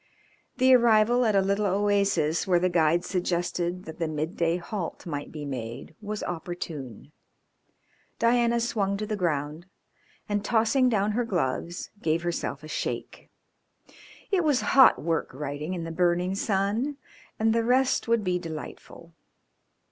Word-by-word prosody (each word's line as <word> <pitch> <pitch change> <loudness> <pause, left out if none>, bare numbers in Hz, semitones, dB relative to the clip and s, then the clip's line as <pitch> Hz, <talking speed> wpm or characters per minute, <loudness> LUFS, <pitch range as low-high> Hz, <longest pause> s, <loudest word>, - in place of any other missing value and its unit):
The 260 0 +5
arrival 235 +1 +4
at 215 -2 +2
a 195 - +5
little 200 +2 +1
oasis 195 -5 +1
where 180 -2 +4
the 180 +1 +2
guide 170 +1 +2
suggested 175 0 -2
that 160 +1 -9
the 165 - 0
midday 165 +2 -1
halt 180 0 -5
might 145 -4 -5
be 150 -2 -6
made 120 -4 -6
was 210 0 -4
opportune. 160 - -6 1.1
Diana 235 0 +3
swung 200 -4 0
to 215 - -3
the 215 - -2
ground, 155 -2 -2 0.6
and, 205 -1 -1
tossing 240 +4 +3
down 210 -2 +1
her 240 +3 0
gloves, 170 - -2
gave 165 -1 0
herself 165 -4 -3
a - - -8
shake. - - -5 1.0
It 375 -3 +2
was 295 -5 +2
hot 265 -1 +7
work 165 +1 -1
riding 150 +5 -4
in 170 - -4
the 165 - -5
burning 175 +2 +1
sun 205 +8 -1 0.4
and 220 0 +2
the 230 0 +1
rest 255 +2 +2
would 230 -2 +2
be 180 -1 0
delightful. 160 -3 -9
185 Hz, 145 wpm, -27 LUFS, 165-220 Hz, 1.1 s, hot